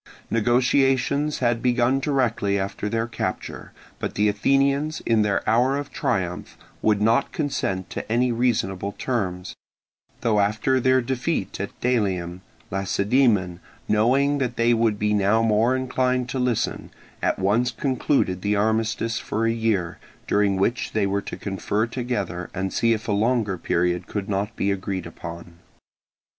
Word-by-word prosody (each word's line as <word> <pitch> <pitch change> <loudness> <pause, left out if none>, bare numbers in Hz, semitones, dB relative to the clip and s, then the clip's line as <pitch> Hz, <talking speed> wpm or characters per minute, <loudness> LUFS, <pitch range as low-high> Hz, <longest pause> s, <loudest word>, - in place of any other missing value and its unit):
Negotiations 130 +5 +2
had 120 0 +3
been 125 -1 +2
begun 120 +2 +2
directly 120 -8 0
after 100 +1 -3
their 115 +1 0
capture, 115 - -5 0.3
but - - -4
the 105 +1 +3
Athenians 140 +8 +1
in 115 -2 +3
their 105 -2 0
hour 125 +5 +3
of 145 0 -5
triumph 90 -2 -2 0.2
would 105 -1 +2
not 115 +5 +2
consent 100 - -2
to - - -5
any 125 +2 +2
reasonable 100 -5 0
terms; 95 -7 -3 0.7
though 110 -3 +2
after 110 +6 +2
their 130 +1 +3
defeat 125 - -2
at 100 - -6
Delium, 95 -8 0 0.3
Lacedaemon, 95 -1 +1 0.3
knowing 135 +7 +3
that 125 -3 -1
they 115 +1 +3
would 115 -2 +2
be 105 0 +1
now 105 +2 +3
more 115 +3 +3
inclined 130 -1 0
to 130 - -2
listen, 125 -3 -1 0.3
at - - +1
once 105 +6 +2
concluded 125 -7 0
the 105 +1 +1
armistice 110 +2 0
for 110 +2 -2
a 115 - +2
year, 110 -7 -1 0.3
during 100 -1 +2
which 115 +6 0
they 110 -2 +1
were 100 +1 0
to - - -7
confer 100 +2 -1
together 110 -8 -3
and 95 0 -2
see 115 0 +3
if 110 +1 -4
a - - 0
longer 110 -1 +1
period 90 0 0
could 100 -2 -4
not 105 +2 -2
be 100 - 0
agreed 95 -1 -3
upon. 85 0 -9
110 Hz, 150 wpm, -24 LUFS, 100-125 Hz, 0.7 s, had